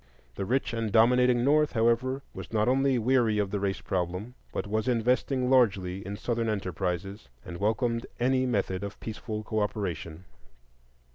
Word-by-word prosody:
The 95 - -4
rich 130 +3 0
and 115 -2 -2
dominating 120 +2 +4
North, 150 +2 +3
however, 120 +4 +1
was - - -8
not 110 0 +1
only 135 +1 +3
weary 120 -2 +2
of 100 -2 0
the 105 - -1
race 95 -1 -2
problem, 90 +6 -3 0.2
but - - -3
was 110 +2 -1
investing 125 +2 +1
largely 100 -7 +2
in 100 +1 -6
Southern 115 0 -1
enterprises, 95 - -3 0.2
and 85 -1 -7
welcomed 115 +4 0
any 130 +1 +2
method 100 -5 -1
of 100 0 -6
peaceful 110 -1 -5
cooperation. 95 -6 -3
110 Hz, 150 wpm, -28 LUFS, 100-125 Hz, 0.2 s, dominating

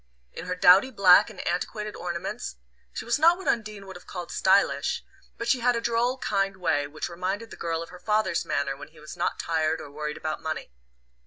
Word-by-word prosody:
In 180 - -7
her 180 - -1
dowdy 185 +6 +6
black 190 -7 +6
and - - -9
antiquated 210 +4 -2
ornaments 180 - -4 0.4
she - - -6
was 235 +4 +1
not 335 +3 +6
what 380 - -9
Undine 215 -3 -1
would 190 -1 -10
have 175 - -13
called 175 -2 -6
"stylish"; 190 +1 +2 0.3
but 230 - -4
she 255 +1 +3
had 245 +1 +3
a - - 0
droll 235 +2 +1
kind 195 -5 -1
way 145 -5 0
which 155 +2 -5
reminded 190 +6 -4
the - - -8
girl 165 -1 -2
of 165 - -12
her 180 - -12
father's 210 -5 +1
manner 140 -1 -1
when 140 - -10
he 155 0 -19
was 150 0 -9
not - - -1
tired 160 -1 0
or 145 - -9
worried 150 +1 -4
about 155 -1 -4
money. 160 - -4
185 Hz, 215 wpm, -26 LUFS, 165-220 Hz, 0.4 s, dowdy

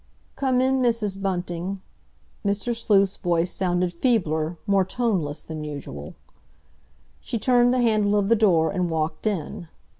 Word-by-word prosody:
"Come 260 -2 +1
in, 260 0 +2
Mrs. 220 -5 0
Bunting." 180 0 -3 0.6
Mr. 205 +4 -1
Sleuth's 200 -4 +2
voice 175 0 0
sounded 180 -1 0
feebler, 170 - 0
more 200 -2 +3
toneless 185 -9 -1
than 155 -1 -6
usual. 140 - -7 1.0
She 235 - -4
turned 245 +1 +4
the 255 0 +2
handle 210 -3 +2
of 200 -1 +1
the 230 - +5
door 180 -7 +3
and 180 -3 -1
walked 160 +4 -2
in. 175 -4 -3
195 Hz, 140 wpm, -24 LUFS, 170-225 Hz, 1.0 s, the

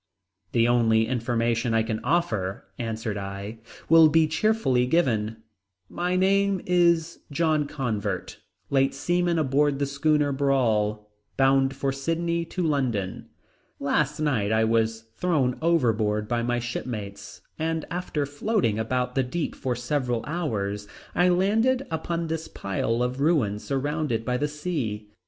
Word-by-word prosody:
"The 115 -1 +4
only 115 -2 +3
information 115 -1 0
I 110 - +3
can 110 -1 -2
offer," 120 - 0
answered 110 -2 -3
I, 100 +3 -6 0.3
"will 165 -1 +7
be 160 +1 +4
cheerfully 155 - +1
given. 115 -8 +1 0.5
My 180 +1 -1
name 195 +1 +3
is 170 -2 +2
John 155 -1 +1
Convert, 125 -9 -3 0.3
late 135 0 +2
seaman 175 +3 +1
aboard 145 -1 +2
the 140 - 0
schooner 145 +1 +1
Brawl, 110 -7 +1 0.3
bound 135 0 +3
from 135 0 -1
Sydney 170 +4 -1
to 180 - -3
London. 125 - -1 0.5
Last 150 +2 0
night 125 -10 +1
I 110 0 +3
was 115 0 +1 0.2
thrown 145 -9 +1
overboard 110 -10 +1
by 120 0 0
my 120 +1 0
shipmates 115 -4 -5 0.2
and 160 0 -1
after 170 -4 -2
floating 145 - 0
about 125 +3 -1
the 135 - +2
deep 150 +6 -3
for 125 -2 -2
several 120 -1 -1
hours 105 - -3 0.3
I 180 +1 +3
landed 225 +9 +2
upon 165 +1 -2
this 160 0 -3
pile 115 +5 -1
of 125 +2 -2
ruins 130 -10 +1
surrounded 140 -4 -1
by 125 -1 0
the 150 - 0
sea. 140 -10 -4
135 Hz, 135 wpm, -25 LUFS, 115-160 Hz, 0.5 s, will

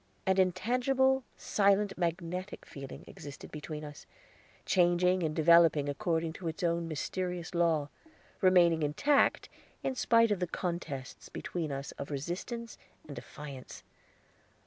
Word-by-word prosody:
An 190 0 +3
intangible, 250 +8 +2
silent, 200 0 +2
magnetic 180 +2 -3
feeling 135 -1 -9
existed 145 -1 -10
between 150 0 -6
us, 150 -1 -10 0.6
changing 180 +1 +3
and 155 -2 -1
developing 160 -2 +5
according 160 +3 -1
to 170 0 -6
its 165 +4 -4
own 170 0 +1
mysterious 180 +2 -3
law, 165 -4 +2 0.5
remaining 175 -4 +5
intact 275 - +2 0.4
in 265 - 0
spite 230 -3 +4
of 205 - +1
the 180 - -1
contests 160 -7 -5
between 165 -4 -4
us 140 0 -4
of - - -5
resistance 180 - -5 0.3
and 145 - -8
defiance. 140 -4 -9
170 Hz, 125 wpm, -31 LUFS, 155-190 Hz, 0.6 s, developing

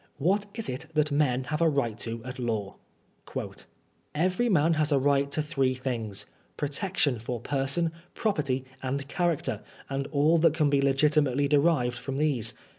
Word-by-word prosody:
What 195 +8 +1
is 225 -1 -4
it 125 - -5
that 150 0 +2
men 135 -3 +2
have 150 +4 -3
a 165 - +5
right 140 -7 0
to 115 0 -5
at 130 +1 -7
law? 110 -5 -2 0.5
''Every 185 +9 -3
man 165 -4 +4
has 155 -1 +1
a 140 - +5
right 140 +1 +2
to 155 +2 -1
three 135 -4 0
things 120 -6 -4 0.2
— - - -37
^protection 145 - 0
for 120 +1 -3
Serson, 140 +5 0 0.2
property 140 - 0 0.2
and 135 +1 -2
character, 170 +1 -1 0.3
and 135 0 -2
all 155 +3 +3
that 160 -1 +4
can 150 -3 +2
be 140 -1 +3
legitimately 140 0 +3
erived 140 -5 +2
from 135 -1 -4
these. 140 -7 0
140 Hz, 165 wpm, -28 LUFS, 130-155 Hz, 0.5 s, a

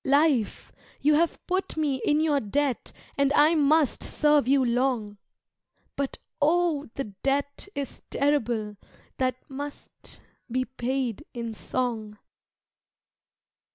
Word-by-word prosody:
Life, 280 -5 +2 0.3
you 300 +1 +4
have 330 +3 +2
put 370 -2 -2
me 285 -5 0
in 300 +1 +3
your 300 -3 +3
debt 275 +4 -1 0.3
And 280 0 +3
I 300 +3 +6
must 305 -2 +3
serve 295 -4 +3
you 270 -1 +4
long 235 -4 0 0.8
But 280 -1 -2 0.2
oh, 315 -1 +2
the 275 - -2 0.2
debt 285 +4 -1
is 280 -2 -4
terrible 235 -7 0 0.4
That 255 -1 +1
must 285 +1 -9 0.3
be 255 +1 0
paid 255 -2 -2
in 230 -1 -4
song. 220 -2 -3
275 Hz, 115 wpm, -27 LUFS, 245-295 Hz, 0.8 s, I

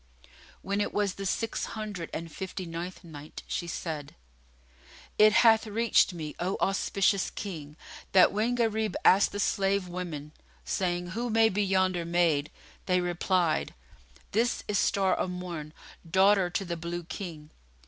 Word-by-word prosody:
When 200 +1 -1
it - - -2
was 205 -2 +1
the 195 0 -4
Six 225 +4 -1
Hundred 205 -6 -5
and 165 0 -5
Fifty 190 +2 -5
ninth 170 +3 -6
Night, 155 -3 -10
She 175 - -3
said, 155 -4 -5 1.0
It 215 0 +8
hath 225 0 +5
reached 225 0 +3
me, 155 -4 -6
O 185 +3 -1
auspicious 195 0 +1
King, 155 -7 -7 0.3
that 185 - +6
when 220 +4 0
Gharib 220 -2 0
asked 195 +2 +6
the 205 - -4
slave 200 -2 +1
women 170 -5 -6 0.3
saying, 175 - -1
"Who 240 +4 -2
may 225 0 +4
be 205 +1 0
yonder 185 -2 +1
maid," 165 -4 +1 0.4
they 180 -1 +3
replied, 175 -1 0 0.6
"This 235 +4 +1
is 205 -1 +1
Star 195 -1 +2
o' - - 0
Morn, 175 -4 -6 0.4
daughter 190 +1 +4
to 195 +2 -2
the 170 -1 -3
Blue 170 +1 -4
King." 160 -4 -7
185 Hz, 150 wpm, -29 LUFS, 170-205 Hz, 1.0 s, It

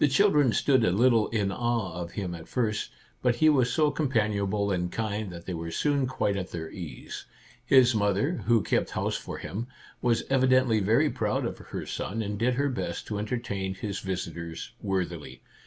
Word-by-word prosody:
The - - +6
children 145 - +4
stood 130 +3 +3
a - - +4
little 115 +3 +4
in 105 -4 0
awe 115 -4 -1
of 85 0 -6
him 95 -4 -3
at 80 -1 -9
first, 110 -4 -1 0.3
but 125 -2 +2
he 155 +5 +5
was 130 -5 +3
so 150 +1 +3
companionable 105 -8 0
and 90 -2 -1
kind 105 -2 -2
that 85 -1 -9
they 90 - -4
were 85 0 -4
soon 140 - +1
quite 105 -5 0
at 95 -2 -3
their 80 -2 -6
ease. 90 -6 -7 0.4
His 130 -3 +6
mother, 105 - +1
who 115 -4 +4
kept - - +1
house - - -1
for - - -5
him, 115 +6 -5 0.3
was 120 -2 +2
evi 130 -1 +2
dently 130 -4 +4
very 105 +4 +3
proud - - -1
of - - -4
her - - -6
son, 110 +3 -3
and 105 0 -4
did 125 +2 +2
her 140 +2 +1
best 130 - -3
to 105 -2 -3
entertain 105 -4 -3
his 100 +1 -4
visitors 85 -3 -5
worthily. 90 -6 -3
110 Hz, 190 wpm, -28 LUFS, 95-125 Hz, 0.4 s, The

